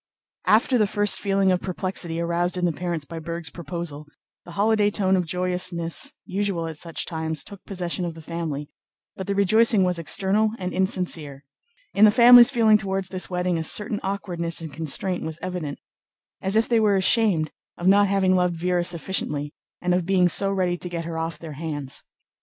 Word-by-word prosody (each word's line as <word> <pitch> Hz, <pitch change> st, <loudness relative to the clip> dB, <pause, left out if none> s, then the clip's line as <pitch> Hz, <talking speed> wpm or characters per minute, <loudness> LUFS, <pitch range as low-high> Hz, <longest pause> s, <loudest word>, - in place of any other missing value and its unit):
After 235 Hz, +3 st, +3 dB
the 210 Hz, -, +3 dB
first 205 Hz, 0 st, +1 dB
feeling 195 Hz, -1 st, +1 dB
of 180 Hz, -, 0 dB
perplexity 180 Hz, -2 st, -3 dB
aroused 170 Hz, +1 st, -1 dB
in 180 Hz, -, 0 dB
the 175 Hz, -, +1 dB
parents 170 Hz, -2 st, -4 dB
by 165 Hz, +2 st, -7 dB
Berg's 170 Hz, +1 st, -6 dB
proposal, 160 Hz, -2 st, -6 dB, 0.4 s
the 175 Hz, -, -11 dB
holiday 210 Hz, +2 st, +2 dB
tone 190 Hz, -2 st, +1 dB
of 180 Hz, -2 st, -1 dB
joyousness 180 Hz, -, 0 dB
usual 195 Hz, -3 st, -2 dB
at 160 Hz, -2 st, -7 dB
such 165 Hz, -2 st, -3 dB
times 160 Hz, -2 st, -2 dB
took 200 Hz, -2 st, -12 dB
possession 180 Hz, -2 st, -3 dB
of 170 Hz, -2 st, -4 dB
the 165 Hz, -, -10 dB
family, 155 Hz, -3 st, -4 dB, 0.5 s
but 190 Hz, -, -7 dB
the 200 Hz, -, -1 dB
rejoicing 210 Hz, +1 st, +4 dB
was 180 Hz, -2 st, 0 dB
external 200 Hz, +6 st, +1 dB
and 180 Hz, -3 st, -5 dB
insincere. 170 Hz, -7 st, -2 dB, 0.5 s
In 210 Hz, -, +6 dB
the -, -, +7 dB
family's 240 Hz, +2 st, +8 dB
feeling 225 Hz, -5 st, +4 dB
toward 195 Hz, -1 st, -3 dB
this 185 Hz, -1 st, -1 dB
wedding 180 Hz, -2 st, -1 dB
a -, -, -2 dB
certain 210 Hz, +5 st, +1 dB
awkwardness 175 Hz, -4 st, -2 dB
and 160 Hz, -3 st, -7 dB
constraint 165 Hz, +4 st, -2 dB
was 160 Hz, 0 st, -5 dB
evident, 175 Hz, -6 st, -5 dB, 0.6 s
as 190 Hz, +2 st, +1 dB
if 220 Hz, +1 st, +3 dB
they 235 Hz, -2 st, +2 dB
were 210 Hz, -2 st, +3 dB
ashamed 190 Hz, -5 st, +3 dB, 0.3 s
of 175 Hz, -, -6 dB
not 200 Hz, +2 st, +5 dB
having 195 Hz, -1 st, +2 dB
loved 180 Hz, -2 st, +1 dB
Véra 180 Hz, 0 st, 0 dB
sufficiently 160 Hz, -4 st, -1 dB, 0.3 s
and 180 Hz, 0 st, +1 dB
of 180 Hz, -1 st, 0 dB
being 185 Hz, -2 st, +3 dB
so 195 Hz, +3 st, +2 dB
ready 180 Hz, -2 st, 0 dB
to 180 Hz, -, -7 dB
get 170 Hz, -1 st, -5 dB
her 165 Hz, -1 st, -4 dB
off 165 Hz, -1 st, -4 dB
their 160 Hz, -1 st, -9 dB
hands. 145 Hz, -5 st, -5 dB
180 Hz, 185 wpm, -23 LUFS, 165-195 Hz, 0.6 s, family's